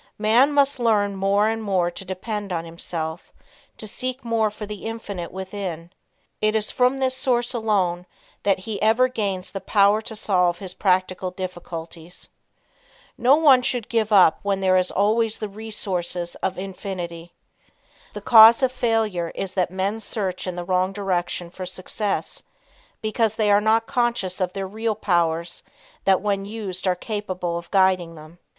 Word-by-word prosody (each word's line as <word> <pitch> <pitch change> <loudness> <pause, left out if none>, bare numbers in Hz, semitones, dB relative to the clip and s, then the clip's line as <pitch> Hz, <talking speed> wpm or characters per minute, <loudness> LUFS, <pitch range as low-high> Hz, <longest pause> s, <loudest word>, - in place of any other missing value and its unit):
Man 230 +7 +4
must 280 -2 +2
learn 210 -4 +2
more 200 +2 +2
and 225 0 -1
more 185 -4 0
to 185 - -9
depend 200 +2 -5
on 165 -1 -2
himself; 165 0 -6 0.5
to 215 - -6
seek 255 +4 -4
more 225 -2 +1
for 210 +1 -8
the 210 0 -7
Infinite 205 -6 -6
within. 185 -3 -6 0.5
It 215 +1 +2
is 215 -1 0
from 250 +2 +2
this 260 -1 0
source 250 -2 +1
alone 190 -6 0 0.3
that 195 -2 +2
he 205 +2 -6
ever 225 +4 +4
gains 195 -6 -3
the 195 - -5
power 200 +2 +3
to 220 0 -8
solve 180 -4 +1
his 185 -1 -8
practical 185 -1 0
difficulties. 175 -2 -8 0.9
No 255 +3 +5
one 285 -5 +6
should 245 -3 -2
give 225 -2 0
up 185 -6 +6
when 200 -1 -1
there 190 -1 +3
is 185 0 +3
always 220 +3 +1
the 215 - -4
resources 190 -5 -3
of 190 - -3
Infinity. 180 -3 -6 0.8
The - - -7
cause 225 +2 +8
of 260 - +3
failure 220 -9 0
is 190 -1 -3
that 180 -2 0
men 190 +4 -2
search 195 -4 -3
in 180 - -3
the 175 0 -5
wrong 185 +1 +1
direction 180 -3 -2
for 185 0 -7
success, 195 +3 -3 0.6
because 220 0 0
they 215 -2 +2
are 205 0 +5
not 220 +1 +2
conscious 235 -7 -1
of 180 -1 -1
their 195 -1 -3
real 220 +2 -2
powers 170 -4 0 0.4
that 190 -1 +4
when 200 -1 -1
used 200 -3 -5
are 180 - +3
capable 185 -4 -4
of 170 0 -6
guiding 185 -3 +2
them. 155 +2 -14
200 Hz, 165 wpm, -23 LUFS, 180-220 Hz, 0.9 s, cause